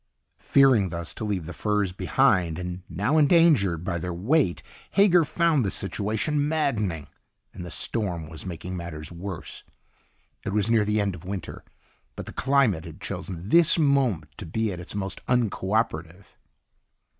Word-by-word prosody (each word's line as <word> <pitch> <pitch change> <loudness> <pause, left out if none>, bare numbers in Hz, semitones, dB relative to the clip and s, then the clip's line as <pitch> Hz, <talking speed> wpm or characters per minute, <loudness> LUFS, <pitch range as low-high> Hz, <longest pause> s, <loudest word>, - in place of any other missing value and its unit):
Fearing, 130 -9 +4
thus, 85 -1 -5
to - - -7
leave 100 -6 -2
the 90 - -7
furs 105 +1 0
behind, 90 -2 +2
and 90 0 -5
now 105 - +1
endangered 145 - +4
by 85 -2 -2
their 90 +2 -4
weight, 110 - +1 0.3
Hager 180 -4 +5
found 160 -2 +2
the 100 - 0
situation 110 +11 -1
maddening. 110 - -1 0.5
And 90 - -8
the 90 - -7
storm 90 -4 -2
was 80 0 -9
making 90 0 -6
matters 85 -3 -6
worse. 90 0 -7 0.8
It 100 - -3
was 105 +1 +1
near 110 -2 +4
the 105 +1 +1
end 100 -2 0
of 85 -1 -10
winter, 95 -1 -6 0.5
but - - -7
the - - -9
climate 130 - +2
had 80 - -10
chosen 90 +1 -6
this 170 +3 +6
moment 130 - +1
to - - -7
be 110 +4 -1
at 90 - -7
its 90 - -9
most 95 -1 -4
unco 110 -5 0
operative. 95 -4 -2
100 Hz, 160 wpm, -25 LUFS, 85-125 Hz, 0.8 s, this